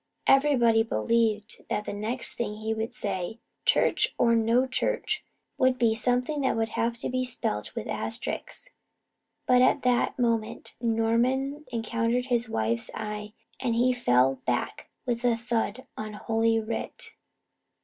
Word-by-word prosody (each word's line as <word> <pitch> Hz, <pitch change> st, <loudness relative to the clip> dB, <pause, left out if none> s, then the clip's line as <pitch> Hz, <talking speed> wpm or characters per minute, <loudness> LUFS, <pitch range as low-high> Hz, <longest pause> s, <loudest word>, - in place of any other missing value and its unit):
Everybody 255 Hz, -5 st, +5 dB
believed 220 Hz, -, 0 dB
that 210 Hz, -, -1 dB
the -, -, -4 dB
next 220 Hz, +5 st, 0 dB
thing 210 Hz, -3 st, -3 dB
he 220 Hz, +1 st, -2 dB
would 220 Hz, +1 st, -3 dB
say, 195 Hz, +1 st, -4 dB, 0.3 s
church -, -, +3 dB
or 235 Hz, -1 st, +4 dB
no 230 Hz, +3 st, +3 dB
church, 265 Hz, -, -1 dB, 0.4 s
would 255 Hz, 0 st, +3 dB
be 230 Hz, -3 st, +3 dB
something 250 Hz, +6 st, 0 dB
that 265 Hz, -, +1 dB
would 225 Hz, 0 st, 0 dB
have 235 Hz, +1 st, -1 dB
to -, -, -2 dB
be 255 Hz, 0 st, 0 dB
spelt 165 Hz, -, -3 dB
with 230 Hz, -2 st, -4 dB
asterisks; 235 Hz, -, -4 dB, 0.7 s
but 250 Hz, 0 st, +5 dB
at 255 Hz, -, +3 dB
that 250 Hz, -1 st, +2 dB
moment 230 Hz, -3 st, -1 dB
Norman 245 Hz, +6 st, +1 dB
encountered 235 Hz, +1 st, 0 dB
his 240 Hz, -2 st, 0 dB
wife's 115 Hz, -, -1 dB
eye 210 Hz, -1 st, -5 dB, 0.3 s
and 235 Hz, -3 st, 0 dB
he 250 Hz, +2 st, +3 dB
fell 135 Hz, -, +3 dB
back 120 Hz, -1 st, -2 dB, 0.2 s
with 240 Hz, -1 st, -2 dB
a 240 Hz, -2 st, +3 dB
thud 235 Hz, +1 st, -2 dB
on 215 Hz, 0 st, -6 dB
Holy 225 Hz, +1 st, +1 dB
Writ. 220 Hz, +1 st, -5 dB
230 Hz, 145 wpm, -27 LUFS, 220-250 Hz, 0.7 s, Everybody